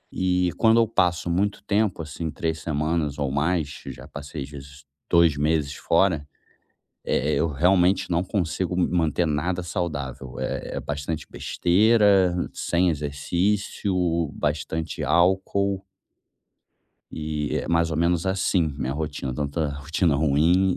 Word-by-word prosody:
E 90 -1 +1
quando 115 0 +5
eu 115 - +4
passo 90 -5 +1
muito 100 +4 0
tempo, 105 -4 0
assim, 80 +2 -5
3 80 0 -2
semanas 75 -1 -1
ou 70 -2 -1
mais 75 0 -1
já - - -8
passei 70 0 -7
as 70 - -10
vezes 70 0 -11 0.2
2 85 -4 +5
meses 75 -1 +1
fora, 85 -4 +1 0.8
eh, 75 +3 0
eu 85 - +1
realmente 90 +5 +3
não 85 0 +2
consigo 90 -1 -2
m 90 - +2
manter 85 -1 +1
nada 85 +4 -1
saudável. 70 -8 -4
É - - -4
é - - -2
bastante 75 +2 -4
besteira, 100 -1 +3 0.2
sem 90 +1 +1
exercício, 85 +8 -1 0.4
bastante 75 +2 -2
álcool. 95 +2 +2 1.3
E 75 -1 -2
é - - -4
mais 85 -1 +2
ou 80 - -2
menos 85 +1 +1
assim 95 -4 +1
minha 65 0 -2
rotina, 70 -4 -4
tanto 70 +2 -3
a 75 -2 +1
rotina 75 +3 0
ruim 80 +6 +3
85 Hz, 135 wpm, -24 LUFS, 75-90 Hz, 1.3 s, quando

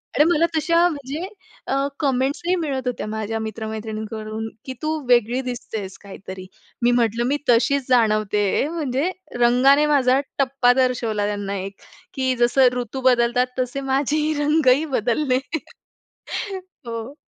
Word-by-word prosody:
आणि 295 - +5
मला 335 0 +3
तशा 335 +2 +3
म्हणजे 295 +3 -5 0.4
अ, 270 - 0 0.2
कमेंट्सही 280 +6 0
मिळत 275 -7 -2
होत्या 245 -3 -3
माझ्या 220 +1 -3
मित्र-मैत्रिणींकडून, 220 0 -5 0.2
की 260 - -5
"तू 310 - 0 0.2
वेगळी 240 +1 +3
दिसतेस 225 -6 -6
काहीतरी." 190 -1 -9 0.4
मी 240 - +5
म्हटलं, 235 -1 +1
मी 285 +3 +1
तशीच 265 +3 +3
जाणवते 215 -4 +2
आहे 285 - +1
म्हणजे 300 -1 -1 0.3
रंगाने 255 +5 +5
माझा 260 -1 +4 0.2
टप्पा 260 -2 +3
दर्शवला, 230 -5 0
त्यांना 205 -1 -3
एक, 195 +1 -6 0.4
की 260 -1 0
जसं 245 +2 +5
ऋतू 245 +2 -5
बदलतात 245 +1 +1
तसे, 255 +2 -2
माझेही 300 +3 +1
रंगही 295 -1 +3
बदलले. 255 +4 +1 1.5
हो. 230 +4 -6
250 Hz, 130 wpm, -22 LUFS, 220-275 Hz, 1.5 s, आणि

